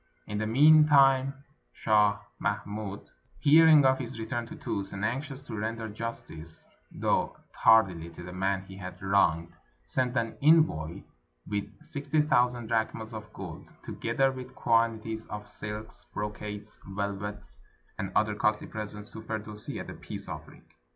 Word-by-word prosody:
In 105 0 -3
the 110 - -1
mean 150 +6 +7
time 135 -1 +4 0.3
Shah 105 -2 +3 0.2
Mahmud, 100 0 -3 0.3
hearing 155 -1 +7
of 130 0 +4
his 120 -3 -5
return 115 +1 -3
to - - -9
Tus, 100 -1 -4
and 100 +1 -2
anxious 135 +3 -3
to 125 - -7
render 110 +1 -3
justice, 105 -8 -7 0.3
though - - 0 0.2
tardily, 95 -7 +4
to 90 - -9
the 90 0 -8
man 95 +1 0
he 95 0 -11
had 90 -1 -8
wronged, 85 -4 +2 0.3
sent 130 0 -1
an 115 -1 -1
envoy 145 - +3 0.4
with 105 -1 -2 0.2
sixty 150 -1 -2
thousand 125 -5 +2
drachms 110 0 -1
of 105 -1 -8
gold, 90 -6 -8
together 135 0 0
with 130 0 -9
quanti 115 -1 +1
ties 110 - -10
of 105 0 -7
silks, 105 +1 -8
brocades, 105 0 -5
velvets, 100 +1 -5 0.4
and 95 -1 -3
other 105 -1 +3
costly 105 +1 +1
presents, 105 -1 -7
to 110 - -8
Firdusi 110 -1 -5
as - - -6
a - - -7
peace - - -7
offering. - - -9
110 Hz, 150 wpm, -29 LUFS, 100-125 Hz, 0.4 s, mean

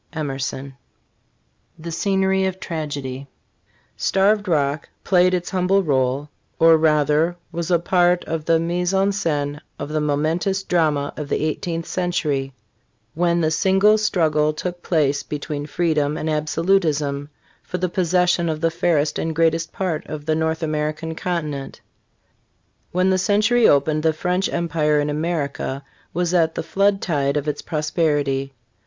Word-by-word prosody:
Emerson. 135 -3 -4 1.0
THE 165 +1 -7
SCENERY 190 +2 +1
OF 190 0 -4
TRAGEDY. 140 -5 -5 0.7
^ - - 0
TARVED 205 +2 +3
ROCK 145 -3 0
played 185 -1 +3
its 175 +2 -4
humble 190 +1 +2
role 135 -1 0 0.3
or, 165 0 +6
rather, 155 +1 +2 0.2
was 170 0 -4
a 175 - +4
part 175 +1 +2
of 160 -1 -3
the. 165 0 +4
3 165 - -2
mise 175 +2 0
en 195 +1 +3
scene 150 -6 -2 0.2
of 145 - -5
the 155 0 -1
momentous 160 +6 0
drama 155 -6 +1
of 150 -2 -6
the - - 0
eighteenth 165 +1 -3
century, 155 -8 -1 0.6
when 170 +1 +1
the 155 -1 +1 0.2
great 210 +2 +5
struggle 155 -7 +2
took 175 +3 -5
place 145 -5 +1
between 145 0 -5
freedom 155 -2 0
and 155 - -2
absolutism 155 -3 0 0.3
for 180 - -5
the 180 +1 0
pos 175 -1 -1
session 175 -1 +2
of 155 -1 -2
the 165 +1 +1
fairest 155 -3 +1
and 160 -1 -2
greatest 165 0 +1
part 175 -5 -2
of 150 -1 -6
the 155 - +1
North 160 +1 -1
American 155 +1 -2
continent 155 -5 -4 1.1
When 185 +1 +2
the 185 - +2
century 215 +5 +3
opened, 150 +2 +3
the 160 0 +2
French 180 +4 -1
empire 155 -3 +1
in 145 0 0
America 145 -3 -2 0.3
was 175 +1 -1
at 165 -2 +2
the 165 - -3
flood 195 +3 +1
tide 140 -3 0
of 145 +1 -3
its 150 - -2
prosperity. 145 -3 -1
160 Hz, 150 wpm, -21 LUFS, 150-180 Hz, 1.1 s, or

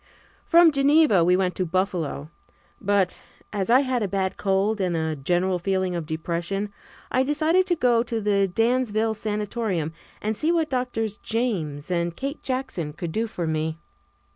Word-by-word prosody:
From 335 -1 +6
Geneva 280 - +4
we 180 +2 +4
went 185 -1 +1
to 185 - +1
Buffalo, 175 -4 -2 0.5
but, 200 -2 +1 0.3
as 200 -1 -1
I 250 +3 +6
had 255 -3 -1
a 205 - 0
bad 190 -1 -1
cold 200 +2 +1
and 180 -3 0
a 160 -1 -1
general 175 +6 0
feeling 185 0 0
of 170 -3 -4
depression, 175 +5 -3 0.4
I 255 - +3
decided 310 +7 +2
to 350 - +2
go 245 -6 +3
to 230 -1 -2
the 200 -2 +1
Dansville 225 0 +1
Sanatorium 210 -6 -2 0.3
and 215 +1 -2
see 310 +9 +1
what 325 -3 +1
Doctors 225 -5 -2
James 180 - -2
and 170 -1 0
Kate 275 - -4
Jackson 255 - -3
could 165 +1 -5
do 225 +6 -1
for 180 -6 -4
me. 160 0 -1
200 Hz, 165 wpm, -24 LUFS, 175-245 Hz, 0.5 s, From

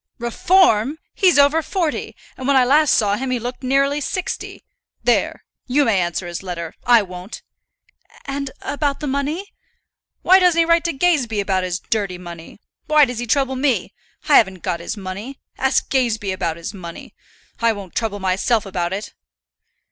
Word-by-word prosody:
"Reform! 260 - +3 0.2
He's 370 -6 +3
over 285 +3 +5
forty, 335 -2 -2 0.2
and 260 - -6
when 280 - +3
I 255 - +5
last 295 +3 +4
saw 205 -1 +2
him 265 +2 -3
he 255 - 0
looked 245 +2 -6
nearly 275 +2 +1
sixty. 365 +5 -4 0.4
There; - - +1 0.2
you 280 +3 +3
may 205 -6 +2
answer 175 +1 -2
his 175 -1 -5
letter; 170 -3 -6
I 240 -3 +6
won't." 180 +2 -9 0.8
"And 275 0 -3
about 285 -1 -1
the - - -4
money?" 290 +8 -3 0.7
"Why 375 +2 +7
doesn't 360 -2 +3
he 335 - +5
write 335 +1 +3
to 335 - 0
Gazebee 270 -8 +1
about 195 -2 0
his 180 -1 -2
dirty 200 -4 -2
money? 170 0 -11 0.3
Why 305 -1 +6
does 245 -3 -5
he 240 - -4
trouble 265 +2 +1
me? 260 -2 0 0.3
I - - +7
haven't 190 -5 +2
got 170 - -2
his 170 - -5
money. 200 +8 -7 0.2
Ask 265 0 +1
Gazebee 230 -7 0
about 170 -3 -2
his 170 +5 -6
money. 170 -4 -9 0.5
I 230 0 +3
won't 200 -4 -8
trouble 220 -3 -2
myself 195 +4 +1
about 180 -2 -2
it." 205 +2 -5
240 Hz, 170 wpm, -20 LUFS, 190-285 Hz, 0.8 s, Why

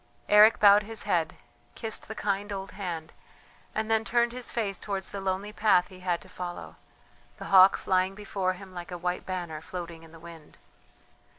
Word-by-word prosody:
Eric 210 +2 +7
bowed 205 0 +7
his 220 0 -5
head, 170 -6 0 0.4
kissed 225 -1 -2
the 220 - -6
kind 205 0 -2
old 195 -1 -5
hand, 175 -5 -6 0.6
and 220 - 0
then 220 0 +3
turned 235 +1 +1
his 250 0 -4
face 210 -4 -2
towards 195 0 -5
the 200 - -5
lonely 195 +2 -2
path 210 -5 +3
he 185 - -13
had 180 -2 -1
to - - -14
follow, 175 -1 -7 0.6
the - - -8
hawk 190 0 +8
flying 185 +1 0
before 195 -2 -2
him 185 0 -12
like 175 -1 -7
a 180 - -5
white 180 +1 -3
banner 175 -4 -4
floating 170 -1 -7
in 165 -1 -15
the 165 - -14
wind. 165 -2 -13
190 Hz, 185 wpm, -28 LUFS, 180-210 Hz, 0.6 s, hawk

